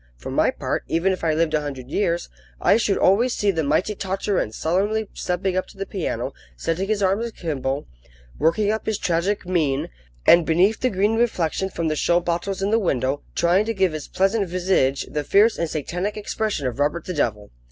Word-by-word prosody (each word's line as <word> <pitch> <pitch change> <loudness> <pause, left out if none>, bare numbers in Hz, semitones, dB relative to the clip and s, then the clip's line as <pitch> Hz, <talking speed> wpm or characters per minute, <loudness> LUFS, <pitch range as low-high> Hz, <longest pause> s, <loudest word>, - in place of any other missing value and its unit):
For - - -7
my - - +3
part, - - -2
even 180 +4 +1
if 185 - -6
I 160 -2 +2
lived 160 -1 +1
a 155 - +2
hundred 135 -3 -7
years, 175 -4 0 0.3
I - - +4
should 215 -3 +1
always 235 +6 +3
see 205 -1 +2
the 165 -4 -1
mighty 165 +8 +1
Tartarin 195 - -1
solemnly 200 - 0
stepping 180 +1 -2
up 185 - -1
to - - -16
the 195 - -3
piano, 190 -5 -3 0.2
setting 170 - -1
his 210 -1 0
arms 195 +5 +1
akimbo, 145 - -3 0.5
working 185 +7 +2
up 220 - -3
his 220 -2 0
tragic 185 +3 0
mien, 155 -7 0 0.4
and, 170 0 +7
beneath 180 +7 +3
the 255 - +1
green 205 +2 +1
reflection 190 -5 0
from 170 -3 -2
the 155 - 0
show 170 +3 +2
bottles 175 +3 -2
in 200 - 0
the 225 - +4
window, 135 - 0
trying 180 +5 +3
to 225 0 -2
give 190 -4 +2
his 155 -2 -5
pleasant 195 +1 +1
visage 175 -7 +1
the 150 - -3
fierce 210 +9 +4
and 170 - -1
satanic 180 +8 -3
expression 210 -6 -2
of 125 +1 -3
Robert 150 +4 0
the 180 - -4
Devil. 105 - -1
180 Hz, 200 wpm, -23 LUFS, 155-200 Hz, 0.5 s, and